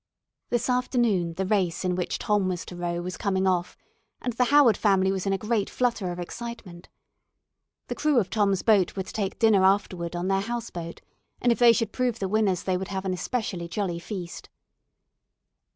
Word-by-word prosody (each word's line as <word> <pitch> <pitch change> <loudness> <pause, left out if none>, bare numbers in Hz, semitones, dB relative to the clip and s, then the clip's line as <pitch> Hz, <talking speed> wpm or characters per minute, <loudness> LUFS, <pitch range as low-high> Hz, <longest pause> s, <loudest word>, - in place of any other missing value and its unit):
This 240 -1 0
afternoon 240 -9 +1
the 190 - -1
race 185 -3 0
in 180 - +1
which 180 0 -2
Tom 210 -3 +1
was 180 -1 -3
to 180 - -9
row 175 0 -3
was 180 0 -5
coming 190 -2 0
off, 180 -2 0 0.4
and 245 - -3
the 250 +2 +2
Howard 275 -5 +5
family 190 -2 +2
was 195 0 -2
in - - +2
a - - +1
great 215 -1 -1
flutter 230 -7 -1
of 175 - -6
excitement. 180 -2 -8 1.0
The - - -4
crew 300 -3 +1
of 205 -6 +1
Tom's 200 -3 +1
boat 205 -5 +3
were 190 - -2
to - - -11
take 200 -3 -2
dinner 220 -4 +4
afterward 185 -3 +1
on 175 +1 -2
their 195 0 +2
house 235 +2 -4
boat, 170 -1 -7 0.4
and 245 - +3
if 235 - 0
they 240 -1 +8
should 230 0 -1
prove 250 -3 0
the 195 - -2
winners 195 -3 +1
they 185 -1 0
would 190 +1 -5
have 190 -1 -4
an 185 - 0
especially 185 -2 -3
jolly 175 -2 -2
feast. 175 -1 -7
195 Hz, 200 wpm, -26 LUFS, 180-230 Hz, 1.0 s, they